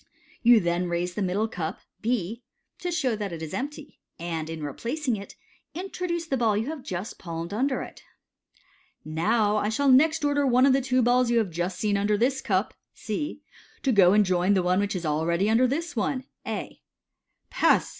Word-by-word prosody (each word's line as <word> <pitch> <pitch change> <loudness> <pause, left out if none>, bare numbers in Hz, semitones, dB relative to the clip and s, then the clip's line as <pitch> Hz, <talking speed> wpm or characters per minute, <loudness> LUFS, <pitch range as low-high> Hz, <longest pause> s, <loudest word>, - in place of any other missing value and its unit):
You 240 -2 +7
then 175 -1 0
raise 175 +1 -1
the 210 - -3
middle 195 +4 0
cup 170 -7 -4 0.2
(B), 230 -1 -1 0.4
to 355 - -3
show 275 -9 0
that 205 -3 -4
it 165 -1 -6
is 155 - -6
empty, 290 +2 -6 0.2
and, 165 -2 -4
in 160 -1 -5
replacing 240 - -2
it, 200 -1 -9 0.4
introduce 355 -2 -3
the 275 -5 -1
ball 225 -4 +2
you 220 - -1
have 315 -4 -7
just 190 +1 -6
pnlmed 165 -1 -5
tinder 260 +6 0
it. - - -11 0.6
" - - -34 0.2
Now 205 +7 +1
I 210 0 0
shall 275 +4 +2
next 310 +3 +4
order 285 -1 +2
one 255 +1 +5
of 275 - +5
the 270 - +3
two 255 -1 +1
balls 245 +1 +3
you 235 - +2
have 215 -6 +1
just 175 +3 -2
seen 205 -2 +1
under 205 +1 +1
this 260 +4 +1
cup 190 -1 0 0.2
(C) 295 +7 -4 0.4
to 270 - +2
go 190 -5 +6
and 210 0 +5
join 185 +2 +2
the 185 - +2
one 180 +1 +2
which 205 0 -1
is 175 -2 -3
already 165 +5 +1
inder 230 +4 +3
this 325 +4 -3
other 255 +4 -1 0.2
(A). - - -5 0.7
Pass! - - +3
215 Hz, 195 wpm, -26 LUFS, 180-260 Hz, 0.7 s, You